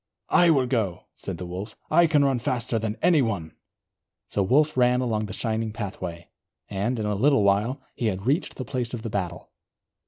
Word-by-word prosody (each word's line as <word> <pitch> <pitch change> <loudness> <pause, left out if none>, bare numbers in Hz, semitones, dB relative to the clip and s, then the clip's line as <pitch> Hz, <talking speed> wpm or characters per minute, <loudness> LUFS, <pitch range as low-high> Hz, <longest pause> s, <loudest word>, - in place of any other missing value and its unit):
"I 175 -1 +5
will 135 -5 +4
go," 110 -8 -1
said 95 -3 -6
the 90 - -6
Wolf. 95 +5 -6 0.2
"I 170 +2 +6
can 150 -3 +3
run 135 -3 +2
faster 120 -1 -1
than 110 0 -3
anyone." 115 - +2 0.8
So 100 - 0
Wolf 150 +10 +3
ran 125 0 +4
along 110 -4 -1
the - - -8
shining 110 -1 -2
pathway, 95 -5 -6 0.4
and 105 +6 -1
in 110 - -2
a 105 - 0
little 125 +2 +3
while 105 +7 +2
he 120 - -2
had 95 -1 -2
reached 145 +8 0
the 130 - -5
place 125 0 -2
of 110 - -8
the 115 - -4
battle. 90 -4 -4
115 Hz, 190 wpm, -25 LUFS, 100-130 Hz, 0.8 s, I